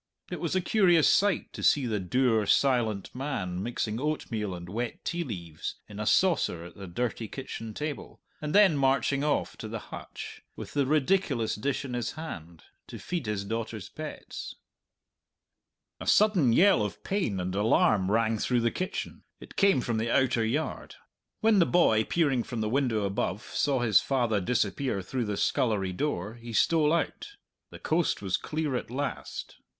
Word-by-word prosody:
It -, -, -4 dB
was -, -, -2 dB
a 185 Hz, -, +2 dB
curious 175 Hz, -4 st, +4 dB
sight 200 Hz, -3 st, +2 dB
to -, -, -7 dB
see 140 Hz, -3 st, +4 dB
the 110 Hz, -3 st, -1 dB
dour, 110 Hz, +2 st, +1 dB
silent 120 Hz, -7 st, +2 dB
man 100 Hz, -10 st, -3 dB
mixing 110 Hz, 0 st, -2 dB
oatmeal 115 Hz, -10 st, -2 dB
and 85 Hz, 0 st, -8 dB
wet 115 Hz, +5 st, -4 dB
tea 175 Hz, 0 st, -1 dB
leaves 85 Hz, -, -6 dB
in 105 Hz, -1 st, -9 dB
a 105 Hz, -, -2 dB
saucer 110 Hz, -, +2 dB
at 85 Hz, -, -11 dB
the 100 Hz, -1 st, -8 dB
dirty 115 Hz, +4 st, -3 dB
kitchen 115 Hz, -3 st, -7 dB
table, 150 Hz, -1 st, -5 dB, 0.2 s
and 150 Hz, +2 st, -2 dB
then 200 Hz, -6 st, +6 dB
marching 140 Hz, +1 st, +2 dB
off 150 Hz, -1 st, 0 dB
to -, -, -6 dB
the -, -, -4 dB, 0.2 s
hutch, -, -, -8 dB
with -, -, -8 dB
the 140 Hz, -2 st, +1 dB
ridiculous 145 Hz, -, +1 dB
dish 140 Hz, +5 st, -2 dB
in 130 Hz, -, -6 dB
his 120 Hz, -1 st, -2 dB
hand, 85 Hz, -, -8 dB, 0.2 s
to -, -, -8 dB
feed 170 Hz, -10 st, -4 dB
his 100 Hz, -2 st, -2 dB
daughter's 110 Hz, -2 st, -4 dB
pets. -, -, -7 dB, 1.4 s
A -, -, -7 dB
sudden 195 Hz, -, +4 dB
yell 190 Hz, -, +5 dB
of 105 Hz, -, -5 dB
pain 180 Hz, -, -1 dB
and 90 Hz, 0 st, -3 dB
alarm 100 Hz, -1 st, +3 dB
rang 110 Hz, +1 st, +2 dB
through 125 Hz, +2 st, +1 dB
the 115 Hz, 0 st, +1 dB
kitchen. 185 Hz, -, -4 dB, 0.2 s
It -, -, -13 dB
came 195 Hz, -10 st, +4 dB
from 120 Hz, -2 st, -1 dB
the 115 Hz, +1 st, -1 dB
outer 125 Hz, -2 st, +2 dB
yard. 135 Hz, +8 st, -2 dB, 0.5 s
When 220 Hz, -2 st, +4 dB
the 170 Hz, -, +4 dB
boy, 110 Hz, -11 st, +4 dB
peering 145 Hz, -7 st, +1 dB
from 115 Hz, -1 st, -4 dB
the 110 Hz, -, -1 dB
window 120 Hz, -4 st, +1 dB
above, 100 Hz, 0 st, -2 dB
saw 135 Hz, -4 st, 0 dB
his 110 Hz, -5 st, +5 dB
father 120 Hz, -6 st, +1 dB
disappear 125 Hz, 0 st, 0 dB
through 125 Hz, +4 st, -2 dB
the 105 Hz, -1 st, -3 dB
scullery 100 Hz, -6 st, +1 dB
door, 105 Hz, -4 st, -2 dB
he 115 Hz, 0 st, -9 dB
stole 155 Hz, +5 st, +3 dB
out. 170 Hz, -, -2 dB, 0.3 s
The -, -, -10 dB
coast 165 Hz, +1 st, 0 dB
was 95 Hz, -1 st, +1 dB
clear 150 Hz, +6 st, -2 dB
at 125 Hz, -, -3 dB
last. 140 Hz, +4 st, -5 dB
120 Hz, 175 wpm, -28 LUFS, 105-150 Hz, 1.4 s, then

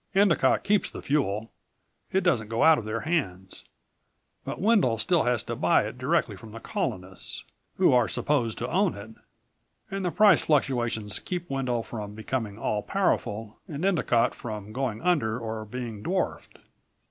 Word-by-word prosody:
Endicott 195 Hz, -3 st, +4 dB
keeps 205 Hz, 0 st, +2 dB
the -, -, -9 dB
fuel. 115 Hz, -7 st, 0 dB, 0.6 s
It 190 Hz, 0 st, +2 dB
doesn't 130 Hz, -, +1 dB
go 115 Hz, +1 st, 0 dB
out 160 Hz, -1 st, +7 dB
of 110 Hz, -, -7 dB
their 110 Hz, +1 st, -2 dB
hands. 95 Hz, -, -3 dB, 0.8 s
But -, -, -5 dB
Wendel 195 Hz, -, +3 dB
still 170 Hz, +10 st, +2 dB
has 120 Hz, -2 st, +1 dB
to -, -, -4 dB
buy -, -, +3 dB
it -, -, -7 dB
directly -, -, +1 dB
from 110 Hz, -1 st, -12 dB
the 115 Hz, -, -7 dB
Colonists, 95 Hz, -, -4 dB, 0.3 s
who -, -, +5 dB
are 125 Hz, -2 st, +4 dB
supposed 125 Hz, -7 st, 0 dB
to 120 Hz, -, -3 dB
own 190 Hz, 0 st, +2 dB
it, 105 Hz, +2 st, -9 dB, 0.8 s
and 195 Hz, 0 st, -3 dB
the 180 Hz, -, +1 dB
price 205 Hz, +3 st, +5 dB
fluctuations 120 Hz, -8 st, 0 dB
keep 175 Hz, -1 st, -4 dB
Wendel 125 Hz, -4 st, -1 dB
from 105 Hz, -3 st, -7 dB
becoming 110 Hz, -2 st, -3 dB
all 105 Hz, -2 st, -1 dB
powerful 110 Hz, -, -1 dB
and 155 Hz, +3 st, -4 dB
Endicott 125 Hz, -11 st, +2 dB
from 105 Hz, -2 st, -7 dB
going 125 Hz, -3 st, -2 dB
under 130 Hz, -11 st, +2 dB
or 110 Hz, -2 st, -5 dB
being 115 Hz, -2 st, -6 dB
dwarfed. 185 Hz, -, -2 dB
120 Hz, 160 wpm, -27 LUFS, 110-170 Hz, 0.8 s, out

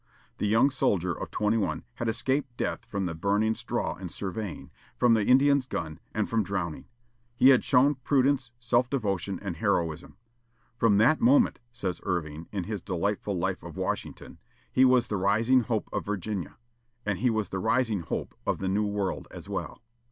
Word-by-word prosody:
The 105 Hz, -, 0 dB
young 115 Hz, +7 st, +4 dB
soldier 90 Hz, -9 st, +1 dB
of -, -, -6 dB
twenty 105 Hz, +2 st, +1 dB
one 105 Hz, -, -1 dB
had 120 Hz, -, -1 dB
escaped 130 Hz, +2 st, -1 dB
death -, -, -2 dB
from 100 Hz, -2 st, -3 dB
the 85 Hz, -, -2 dB
burning 100 Hz, +6 st, +1 dB
straw -, -, -3 dB
in 95 Hz, -1 st, -6 dB
surveying, 100 Hz, +2 st, -5 dB, 0.3 s
from 120 Hz, -2 st, +4 dB
the 110 Hz, -2 st, +3 dB
Indian's 135 Hz, +3 st, +4 dB
gun, 80 Hz, -7 st, -4 dB
and 110 Hz, -1 st, -1 dB
from 115 Hz, -1 st, +1 dB
drowning. 95 Hz, -5 st, -3 dB, 0.5 s
He 130 Hz, -, +6 dB
had 130 Hz, -2 st, +6 dB
shown 135 Hz, +2 st, +4 dB
prudence, 135 Hz, 0 st, +1 dB
self 120 Hz, +1 st, +2 dB
devotion, 100 Hz, -7 st, -1 dB
and 95 Hz, -5 st, -4 dB
heroism. 85 Hz, -5 st, -1 dB, 0.6 s
"From 115 Hz, -4 st, +3 dB
that 120 Hz, +9 st, +4 dB
moment," 250 Hz, +1 st, +4 dB
says 95 Hz, -7 st, -4 dB
Irving, 80 Hz, -3 st, -3 dB
in 100 Hz, -3 st, -2 dB
his 105 Hz, 0 st, -4 dB
delightful 100 Hz, +2 st, -2 dB
life 85 Hz, -, -1 dB
of -, -, -10 dB
Washington, -, -, -4 dB, 0.3 s
"he 130 Hz, -, +5 dB
was 125 Hz, -2 st, +4 dB
the 105 Hz, -, -2 dB
rising 110 Hz, +7 st, +3 dB
hope 115 Hz, -3 st, -2 dB
of -, -, -1 dB
Virginia." 100 Hz, -2 st, -4 dB, 0.5 s
And 100 Hz, -3 st, -1 dB
he 125 Hz, -, +2 dB
was 110 Hz, -2 st, -1 dB
the 95 Hz, -, -3 dB
rising 115 Hz, +1 st, +1 dB
hope 85 Hz, -, -4 dB
of -, -, 0 dB
the 95 Hz, -, -3 dB
new 105 Hz, +2 st, +1 dB
world 100 Hz, -2 st, -2 dB
as -, -, -10 dB
well. 95 Hz, +1 st, -5 dB
105 Hz, 180 wpm, -28 LUFS, 95-125 Hz, 0.6 s, He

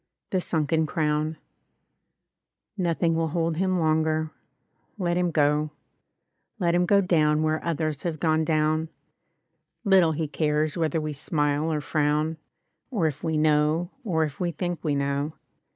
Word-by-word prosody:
|S6| -, -, -58 dB
THE 185 Hz, -, +1 dB
SUNKEN 160 Hz, -1 st, 0 dB
CROWN 155 Hz, 0 st, 0 dB, 1.4 s
Nothing 170 Hz, -3 st, +1 dB
will 165 Hz, 0 st, 0 dB
hold 165 Hz, 0 st, -1 dB
him 185 Hz, 0 st, +1 dB
longer 155 Hz, -1 st, +1 dB, 0.3 s
— -, -, -48 dB, 0.3 s
^let 175 Hz, -2 st, 0 dB
him 180 Hz, 0 st, +1 dB
go; 150 Hz, -1 st, +2 dB, 0.9 s
Let 175 Hz, -4 st, +1 dB
him 175 Hz, 0 st, +2 dB
go 200 Hz, +1 st, +5 dB
down 155 Hz, -4 st, +2 dB
where 155 Hz, 0 st, 0 dB
others 155 Hz, -3 st, -2 dB
have 165 Hz, -3 st, -3 dB
gone 160 Hz, -1 st, +2 dB
down; 155 Hz, 0 st, +1 dB, 0.9 s
Little 190 Hz, -6 st, +4 dB
he 155 Hz, 0 st, -2 dB
cares 150 Hz, 0 st, 0 dB
whether 160 Hz, -2 st, 0 dB
we 155 Hz, -1 st, -3 dB
smile 145 Hz, +1 st, 0 dB
or 150 Hz, -1 st, -1 dB
frown, 150 Hz, +2 st, 0 dB, 0.5 s
Or 210 Hz, -11 st, 0 dB
if 150 Hz, -2 st, -2 dB
we 160 Hz, -2 st, 0 dB
know, 155 Hz, +3 st, +2 dB
or 165 Hz, -8 st, +1 dB
if 150 Hz, -3 st, -4 dB
we 175 Hz, -1 st, 0 dB
think 175 Hz, +2 st, -4 dB
we 150 Hz, -3 st, 0 dB
know. 140 Hz, +2 st, -1 dB
160 Hz, 150 wpm, -26 LUFS, 150-170 Hz, 1.4 s, go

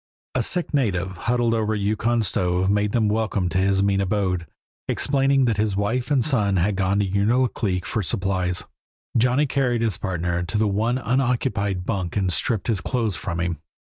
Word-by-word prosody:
A -, -, +1 dB
sick 175 Hz, -3 st, -1 dB
native, 95 Hz, -10 st, 0 dB, 0.2 s
huddled 120 Hz, -1 st, +2 dB
over 110 Hz, -1 st, 0 dB
a -, -, -1 dB
Yukon 110 Hz, +3 st, 0 dB
stove, 90 Hz, 0 st, +1 dB
made 105 Hz, 0 st, +1 dB
them 110 Hz, -2 st, +2 dB
welcome 105 Hz, -3 st, 0 dB
to 95 Hz, -, 0 dB
his 95 Hz, 0 st, +2 dB
mean 100 Hz, 0 st, +2 dB
abode, 95 Hz, -3 st, -1 dB, 0.4 s
explaining 135 Hz, -1 st, +2 dB
that 115 Hz, -3 st, +1 dB
his 105 Hz, -2 st, 0 dB
wife 115 Hz, +6 st, -1 dB
and 140 Hz, -4 st, +2 dB
son 105 Hz, -10 st, +1 dB
had 95 Hz, +3 st, +1 dB
gone 95 Hz, +1 st, +1 dB
to 100 Hz, -1 st, +1 dB
Unalaklik 100 Hz, -2 st, 0 dB
for 110 Hz, -, -1 dB
supplies. 95 Hz, -1 st, -1 dB, 0.5 s
Johnny 125 Hz, +5 st, +3 dB
carried 125 Hz, -4 st, 0 dB
his 105 Hz, -4 st, 0 dB
partner 85 Hz, -2 st, -2 dB
to 90 Hz, +5 st, -2 dB
the 110 Hz, 0 st, +2 dB
one 110 Hz, +5 st, 0 dB
unoccupied 115 Hz, -7 st, 0 dB
bunk 95 Hz, -3 st, -2 dB
and 95 Hz, -3 st, +1 dB
stripped 105 Hz, +2 st, 0 dB
his 110 Hz, -5 st, 0 dB
clothes 115 Hz, -6 st, -1 dB
from 85 Hz, -1 st, -4 dB
him. 85 Hz, -3 st, -2 dB
105 Hz, 180 wpm, -23 LUFS, 95-120 Hz, 0.5 s, Johnny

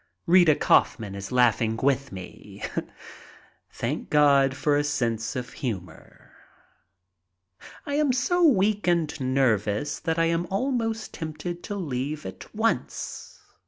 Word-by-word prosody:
Rita 175 Hz, -4 st, +6 dB
Kaufman 105 Hz, -7 st, +2 dB
is 100 Hz, -1 st, -7 dB
laughing 115 Hz, -2 st, +2 dB
with 140 Hz, +2 st, 0 dB
me. 95 Hz, -2 st, -10 dB, 1.1 s
Thank -, -, -4 dB
heaven 140 Hz, -2 st, +5 dB
for 145 Hz, +2 st, 0 dB
a 145 Hz, -, +2 dB
sense 120 Hz, -6 st, -1 dB
of 125 Hz, -1 st, -4 dB
humor. 95 Hz, -, -7 dB, 1.5 s
I 285 Hz, -, -4 dB
am 295 Hz, -2 st, +2 dB
so 350 Hz, +8 st, +1 dB
weak 210 Hz, -, +3 dB
and 170 Hz, -4 st, +2 dB
nervous 130 Hz, -3 st, 0 dB
that 160 Hz, 0 st, -2 dB
I 165 Hz, -, +3 dB
am 170 Hz, +1 st, 0 dB
almost 225 Hz, +1 st, -2 dB
tempted 160 Hz, +2 st, -5 dB
to 205 Hz, -, -4 dB
leave 150 Hz, -4 st, -3 dB
at -, -, -9 dB
once. 225 Hz, +1 st, -2 dB
145 Hz, 125 wpm, -26 LUFS, 125-185 Hz, 1.5 s, Rita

